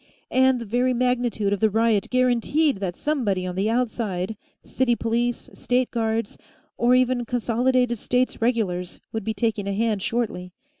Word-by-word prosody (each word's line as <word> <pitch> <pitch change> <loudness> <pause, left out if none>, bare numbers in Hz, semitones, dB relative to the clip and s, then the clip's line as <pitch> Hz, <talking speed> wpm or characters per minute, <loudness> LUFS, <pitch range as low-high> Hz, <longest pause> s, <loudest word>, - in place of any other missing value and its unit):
And 260 -1 +4
the 235 - -6
very 245 +4 +1
magnitude 240 -4 0
of 200 - -2
the 220 - +3
riot 220 -1 +1
guaranteed 255 +3 +2
that 190 -3 -3
somebody 220 -12 -1
on 180 - -3
the 195 +4 0
outside, 220 -5 -1 0.3
city 250 -2 +1
police, 235 +1 -1
State 250 0 0
guards, 225 -2 -2 0.4
or 245 +1 +3
even 255 -1 +2
Consolidated 245 +1 +1
States 250 +2 0
regulars, 200 -7 -1
would 220 - -3
be 220 +1 -3
taking 210 -1 -1
a 200 - -1
hand 215 -1 0
shortly. 185 -6 -2
230 Hz, 155 wpm, -24 LUFS, 205-250 Hz, 0.4 s, And